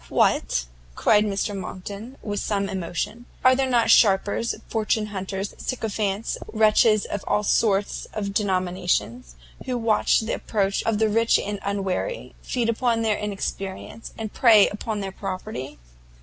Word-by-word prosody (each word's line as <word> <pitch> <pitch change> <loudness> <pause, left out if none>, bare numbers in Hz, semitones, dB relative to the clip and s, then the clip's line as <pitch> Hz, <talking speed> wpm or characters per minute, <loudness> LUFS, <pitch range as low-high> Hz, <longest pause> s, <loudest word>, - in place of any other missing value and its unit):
"What!" - - +2 0.3
cried 210 0 +4
Mr 205 0 -1
Monckton, 200 +6 -7
with 205 -1 -2
some 200 -2 -1
emotion, 200 +6 -4 0.2
"are 255 0 +7
there 265 0 0
not 235 -3 +3
sharpers, 205 +2 +3
fortune 220 -1 0
hunters, 195 -1 -4
sycophants, 215 -4 -2
wretches 215 -1 +4
of 205 - -4
all 210 - +1
sorts 200 -1 +1
and 200 -2 -4
denominations, 180 - -1 0.3
who 250 -1 -1
watch 225 -1 +2
the 220 - -3
approach 195 -2 -1
of 225 -2 +2
the 220 +1 +3
rich 230 +2 +3
and 205 0 -4
unwary, 200 - -3
feed 240 -3 -1
upon 230 0 +1
their 215 -2 +1
inexperience, 200 +1 -5
and 220 -2 -5
prey 220 -5 +6
upon 210 0 -4
their 195 -1 -4
property?" 185 - -6
210 Hz, 140 wpm, -24 LUFS, 195-225 Hz, 0.3 s, are